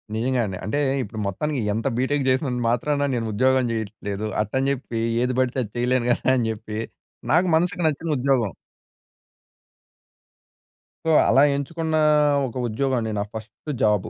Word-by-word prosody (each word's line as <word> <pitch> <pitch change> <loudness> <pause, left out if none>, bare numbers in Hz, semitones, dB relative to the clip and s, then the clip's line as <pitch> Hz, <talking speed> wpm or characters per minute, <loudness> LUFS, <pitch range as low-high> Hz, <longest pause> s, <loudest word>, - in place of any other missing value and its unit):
నిజంగా 125 +3 0
అండి. 95 -3 -5
అంటే 110 +8 -1 0.2
ఇప్పుడు 110 +1 -7
మొత్తానికి 145 +8 -2
ఎంత 115 +5 -1
బీటెక్ 135 +2 0
చేసినంత 130 -2 0
మాత్రాన 145 +4 +1
నేను 115 -2 -2
ఉద్యోగం 130 +3 +3
చేయట్లేదు. 105 -2 -4 0.2
అట్టని 130 +6 0
చెప్పి 120 -3 -5 0.2
ఏది 125 0 0
పడితే 130 0 0
అది 105 - -9
చేయలేను 125 0 +1
కదా - - -1
అని 115 -2 0
చెప్పి 110 0 -6 0.5
నాకు 175 +4 +4
మనసుకి 180 +2 0
నచ్చిన 155 +2 -2
ఉద్యోగం. 125 -6 +1 2.5
సో 160 - +4 0.2
అలా 135 - +5
ఎంచుకున్నా 160 +3 -1 0.5
ఒక 120 - -10
ఉద్యోగం 130 +3 0
అండి. 110 -1 -3
నా 100 - 0
ఫస్ట్ 110 +7 -7
జాబు 105 0 +2
125 Hz, 145 wpm, -23 LUFS, 110-140 Hz, 2.5 s, అలా